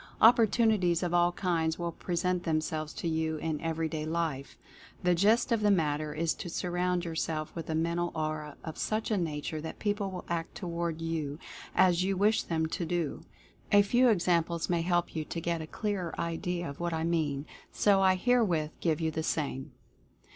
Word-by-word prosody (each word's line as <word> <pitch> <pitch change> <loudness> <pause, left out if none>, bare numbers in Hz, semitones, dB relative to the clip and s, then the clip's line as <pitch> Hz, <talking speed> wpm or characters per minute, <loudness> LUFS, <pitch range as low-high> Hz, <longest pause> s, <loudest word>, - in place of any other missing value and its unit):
Opportunities 220 -6 +4
of 175 -1 -1
all 175 0 +4
kinds 165 -3 0
will 170 -1 -2
present 180 +1 -1
themselves 155 -1 -1
to - - -3
you 160 -1 0
in 155 -1 -3
everyday 160 -1 -2
life. 155 -4 -2 0.5
The 180 0 +4
gist 210 +8 +3
of 230 -2 +2
the 210 - +3
matter 155 -5 +1
is 160 +2 0
to 175 - -7
surround 180 +1 -1
yourself 160 -2 -3
with 165 -2 -6
a 160 - 0
Men 165 +1 0
tal 175 0 0
Aura 155 -1 -3
of 160 - -7
such 220 +1 -1
a 210 - +2
nature 155 -2 -3
that 160 - -6
people 205 -1 -1
will 185 -1 -7
act 165 -1 -3
toward 170 -3 -3
you 160 -3 -2 0.4
as 185 -1 +4
you 195 0 0
wish 210 +3 +3
them 160 -1 -1
to 165 +2 -3
do. 165 -1 -2 0.5
A 205 0 +7
few 245 +5 +4
examples 170 -4 +1
may 170 -1 +2
help 175 0 0
you 155 - -1
to 165 - -4
get 170 0 -1
a 155 - -6
clearer 195 -3 -3
idea 170 +1 -2
of 140 - -8
what 170 0 -1
I 160 0 -1
mean, 155 -4 0 0.3
so 200 -2 +3
I 190 -1 +5
herewith 185 -8 +2
give 160 -2 +1
you 160 -1 0
the 160 - -2
same. 145 -3 -2
170 Hz, 190 wpm, -30 LUFS, 160-180 Hz, 0.5 s, A